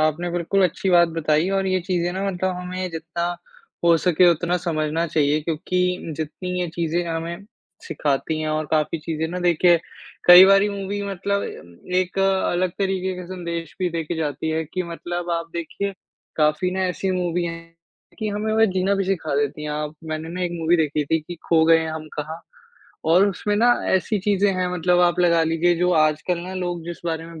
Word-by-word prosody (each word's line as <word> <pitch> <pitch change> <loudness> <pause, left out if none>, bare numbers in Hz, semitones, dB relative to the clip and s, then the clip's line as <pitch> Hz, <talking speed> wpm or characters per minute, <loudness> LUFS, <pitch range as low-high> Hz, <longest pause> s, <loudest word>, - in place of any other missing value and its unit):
आपने 155 +3 0
बिल्कुल 175 +3 0
अच्छी 185 +1 -1
बात 175 -1 +5
बताईं 160 +1 +1
और 195 -1 0
ये 185 -1 +1
चीज़ें 175 -1 -1
ना 190 +1 -3
मतलब 185 +1 -1
हमें 180 0 -4
जितना 165 +1 -4 0.6
हो 170 -1 +6
सके 180 +1 +4
उतना 175 +2 0
समझना 160 -1 -1
चाहिए 150 -1 +1
क्योंकि 180 +2 -1
जितनी 160 +4 -5
ये 175 - -1
चीज़ें 170 +1 -1
हमें 170 +3 -4 0.4
सिखाती 150 +1 -1
हैं 155 - -2
और 155 0 -1
काफ़ी 155 +1 +1
चीज़ें 160 0 -3
ना 180 - -4
देखिए, 175 0 +4 0.5
कई 180 +1 +11
बारी 195 +1 +5
मूवी 200 0 -4
मतलब 200 +1 -1 0.5
एक 185 +1 0
अलग 190 -2 +1
तरीके 190 -1 -1
के 180 - -7
संदेश 170 -3 -5
भी 180 - +1
देके 165 0 -3
जाती 150 0 -2
है 160 0 -1
कि, 180 +4 -4
मतलब 175 +1 -5
आप 165 0 -2
देखिए, 175 +4 -4 0.4
काफ़ी 155 +4 +2
ना 190 +1 -2
ऐसी 190 +1 -2
मूवी 180 -1 -1
हैं 165 0 -4 0.6
कि, 215 - -2
हमें 210 +1 -2
वह 220 0 +5
जीना 190 +2 +1
भी 195 -1 0
सिखा 165 -6 -1
देती 145 +1 -1
हैं 150 - -4
आप 150 +1 -3
मैंने 155 +1 -4
ना 180 +2 -4
एक 175 - -1
मूवी 165 +2 +3
देखी 150 -2 0
थी 160 +2 0
कि 175 +3 -8
खो 160 -1 +4
गए 165 0 +6
हैं 160 - -2
हम 155 -1 -6
कहाँ। 160 +2 -5 0.7
और 185 +4 +6
उसमें 205 +2 -2
ना 240 +2 +5 0.2
ऐसी 200 +3 +1
चीज़ें 200 -1 +2
हैं 185 0 0
मतलब 180 +1 +2
आप 175 0 +3
लगा 170 -2 +4
लीजिए 165 +2 +2
जो 180 +1 +2
आजकल 155 +3 +2
ना 185 +2 -7
लोग 175 -2 -3
जिस 175 0 -7
बारे 165 0 -3
में 165 -1 -10
175 Hz, 195 wpm, -22 LUFS, 160-185 Hz, 0.7 s, कई